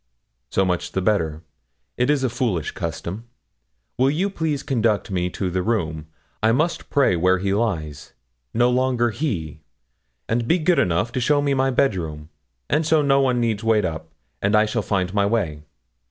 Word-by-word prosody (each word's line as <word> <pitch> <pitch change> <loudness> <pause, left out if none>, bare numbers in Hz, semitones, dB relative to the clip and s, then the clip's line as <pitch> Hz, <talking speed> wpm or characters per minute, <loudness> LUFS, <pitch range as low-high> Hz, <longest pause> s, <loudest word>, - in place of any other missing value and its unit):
'So 95 - +1
much 90 -2 -2
the - - 0
better; 85 -6 0 0.5
it 125 +2 +1
is 145 -2 +2
a 130 - +2
foolish 110 - -1
custom. 105 +7 -5 0.7
Will 130 +1 +4
you 180 +8 0
please 160 -6 -2
conduct 115 -6 0
me 90 -1 0
to 90 +1 -3
the 90 +1 0
room? 80 -8 -2 0.3
I 110 - +4
must 155 +7 -1
pray 140 -10 +3
where 90 +2 +3
he 95 +1 -1
lies 85 -10 -2 0.4
no 120 +2 +3
longer 125 -2 +1
he! 90 - -3 0.7
And 115 +1 0
be 170 - +4
good 170 +1 +2
enough 90 +6 +1
to 130 - -2
show 145 +4 +3
me 145 -1 +1
my 135 0 +2
bedroom, 85 - -1 0.4
and 155 - +1
so 155 -1 +3
no 140 -1 +4
one 125 -2 +2
need 115 -3 0
wait 110 -3 +2
up, 80 -2 -5 0.3
and 105 +2 +2
I 105 0 +5
shall 110 +1 -1
find 95 -3 -1
my 100 -1 +2
way.' 95 -10 -1
110 Hz, 180 wpm, -22 LUFS, 90-130 Hz, 0.7 s, I